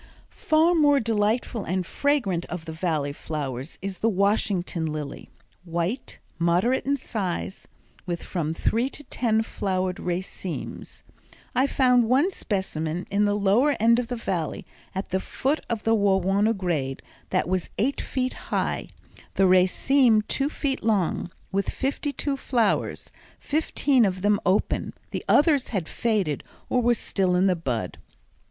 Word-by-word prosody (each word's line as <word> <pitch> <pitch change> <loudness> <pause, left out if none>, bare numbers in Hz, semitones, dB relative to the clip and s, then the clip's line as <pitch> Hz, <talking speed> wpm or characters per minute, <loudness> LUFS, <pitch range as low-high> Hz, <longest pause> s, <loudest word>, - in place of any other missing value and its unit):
Far 320 +2 +3
the 335 - +2
most 290 -4 +4
delightful 220 +1 0
and 185 +1 -1
fragrant 210 -10 0
of 175 -2 -6
the 160 - -5
Valley 160 -4 -1
flowers 140 -3 -5
is 195 -1 -4
the 225 - +2
Washington 195 -4 +1
lily, 150 -2 -5 0.3
white, 175 +8 -3 0.2
moderate 180 +11 +2
in 280 0 +2
size, 190 -7 -4 0.4
with 175 -1 -3
from 165 -3 -2
three 235 +8 +1
to 295 - -9
ten 225 -4 0
flowered 185 -4 -2
racemes. 180 0 -5 0.5
I 265 +2 +3
found 250 -3 +4
one 280 +10 +4
specimen 180 - -2
in 205 +1 +3
the 205 0 +2
lower 210 +9 +3
end 230 +2 +5
of 245 - -2
the 245 - -3
Valley 180 -9 -3 0.3
at 190 - -3
the 190 - 0
foot 275 +9 -1
of 225 -2 -2
the 225 - +3
Wawona 200 +1 +2
grade 150 -8 -2 0.3
that - - +1
was 185 -1 -1
eight 265 +6 0
feet 255 -1 -2 0.2
high, - - -1 0.5
the 195 - +4
raceme 215 +6 +4
two 275 +6 -1
feet 280 -3 -2
long, 205 -6 +1 0.2
with 195 0 0
fifty 285 +2 -1
two 280 -1 -2
flowers, 240 -4 0 0.3
fifteen 285 -4 +2
of 185 -1 -2
them 205 0 +3
open; 190 +3 +1 0.2
the - - -4
others 290 -3 +4
had 190 -8 -2
faded 205 - 0 0.3
or 250 - +2
were 240 0 +3
still 190 -4 0
in 180 +2 +3
the 185 -2 +3
bud. 120 - -3
200 Hz, 150 wpm, -25 LUFS, 180-250 Hz, 0.5 s, end